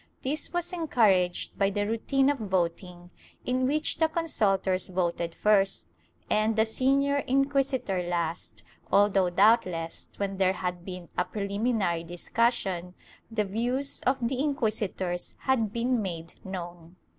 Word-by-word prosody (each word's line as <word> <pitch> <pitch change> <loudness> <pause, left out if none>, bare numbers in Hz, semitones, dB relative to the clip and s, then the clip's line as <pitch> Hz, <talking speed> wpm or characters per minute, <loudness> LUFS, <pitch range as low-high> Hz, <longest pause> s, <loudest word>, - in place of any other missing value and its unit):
This 295 +4 -1
was 350 +1 -1
encouraged 210 - +1
by 195 -1 +3
the 205 0 -1
routine 265 +6 +2
of 285 - -4
voting, 180 -2 -2 0.3
in 255 +1 +1
which 305 +3 0
the 320 - +4
consultors 195 - +1
voted 175 -2 -1
first 195 - +2 0.4
and 215 +1 +2
the 220 0 +4
senior 275 +5 +2
inquisitor 270 -7 +1
last, 175 -1 -3 0.3
although 200 -2 +4
doubtless, 180 -4 +2
when 195 -1 -2
there 190 -1 +3
had 180 -1 -4
been 180 -2 -8
a - - +4
preliminary 200 -4 -1
discussion, 180 0 -1 0.3
the 225 -2 0
views 245 +7 0
of 255 -2 +2
the 255 +1 -2
inquisitors 215 -10 -2
had 230 -6 0
been 240 +1 0
made 170 -4 -5
known. 175 -2 -7
205 Hz, 130 wpm, -28 LUFS, 180-250 Hz, 0.4 s, the